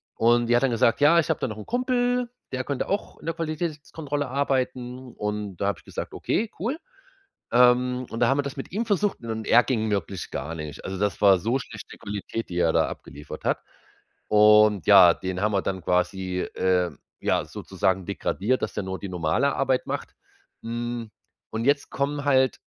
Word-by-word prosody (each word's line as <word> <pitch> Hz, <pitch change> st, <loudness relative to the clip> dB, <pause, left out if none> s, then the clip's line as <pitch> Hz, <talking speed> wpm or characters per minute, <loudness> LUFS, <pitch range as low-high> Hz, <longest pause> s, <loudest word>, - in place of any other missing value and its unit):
Und 120 Hz, +1 st, +3 dB
die 120 Hz, -, +4 dB
hat 120 Hz, -, +3 dB
dann 135 Hz, -, +2 dB
gesagt: 115 Hz, +2 st, +2 dB
„Ja, 165 Hz, +4 st, +6 dB
ich 165 Hz, -, 0 dB
hab -, -, +1 dB
da -, -, -1 dB
noch 110 Hz, -2 st, -6 dB
'n 105 Hz, -, -8 dB
Kumpel, 245 Hz, 0 st, 0 dB, 0.2 s
der 130 Hz, 0 st, -1 dB
könnte 140 Hz, -1 st, -3 dB
auch 200 Hz, +2 st, -2 dB
in -, -, -14 dB
der 165 Hz, -, -2 dB
Qualitätskontrolle 155 Hz, -3 st, -3 dB
arbeiten.“ 130 Hz, -2 st, -2 dB
Und 105 Hz, -3 st, -4 dB
da 100 Hz, -, -1 dB
hab 100 Hz, -, 0 dB
ich -, -, -21 dB
gesagt: -, -, -6 dB
„Okay, 220 Hz, +1 st, -1 dB
cool.“ 245 Hz, -, -2 dB, 0.7 s
Ähm, 125 Hz, +1 st, +4 dB
und 115 Hz, -, -5 dB
da 120 Hz, -, +4 dB
haben 135 Hz, +1 st, +2 dB
wir -, -, +2 dB
das 140 Hz, -1 st, -6 dB
mit 135 Hz, -, -7 dB
ihm 225 Hz, +5 st, -1 dB
versucht, 205 Hz, -1 st, 0 dB
und 110 Hz, -1 st, -5 dB
er 120 Hz, -, +6 dB
ging 110 Hz, -4 st, 0 dB
wirklich 95 Hz, -2 st, -3 dB
gar 75 Hz, +5 st, -4 dB
nicht. 75 Hz, -3 st, -7 dB
Also, 95 Hz, 0 st, -4 dB
das 100 Hz, -3 st, -1 dB
war 95 Hz, -2 st, +7 dB
so 115 Hz, +8 st, 0 dB
schlechte -, -, -10 dB
Qualität, 105 Hz, +2 st, -5 dB
die 90 Hz, -, -3 dB
er 85 Hz, -2 st, +3 dB
da -, -, +2 dB
abgeliefert 75 Hz, +1 st, -9 dB
hat. -, -, +1 dB, 0.7 s
Und 105 Hz, -2 st, +5 dB
ja, 95 Hz, -4 st, +8 dB
den 95 Hz, 0 st, -4 dB
haben 105 Hz, 0 st, +1 dB
wir 100 Hz, -, +1 dB
dann 95 Hz, -1 st, -2 dB
quasi, 90 Hz, +1 st, 0 dB
äh, 90 Hz, -2 st, +2 dB, 0.3 s
ja, -, -, +1 dB
sozusagen 95 Hz, 0 st, -2 dB
degradiert, 100 Hz, +4 st, -1 dB
dass -, -, -3 dB
der 105 Hz, -, -3 dB
nur 95 Hz, 0 st, -4 dB
die 100 Hz, -, -6 dB
normale 90 Hz, -, +1 dB
Arbeit 135 Hz, -2 st, 0 dB
macht. -, -, -4 dB, 0.5 s
Mhm, 120 Hz, 0 st, -4 dB, 0.4 s
und 110 Hz, +1 st, -3 dB
jetzt 140 Hz, +1 st, +1 dB
kommen 145 Hz, +1 st, -2 dB
halt 130 Hz, -4 st, +3 dB
115 Hz, 200 wpm, -25 LUFS, 100-140 Hz, 0.7 s, ja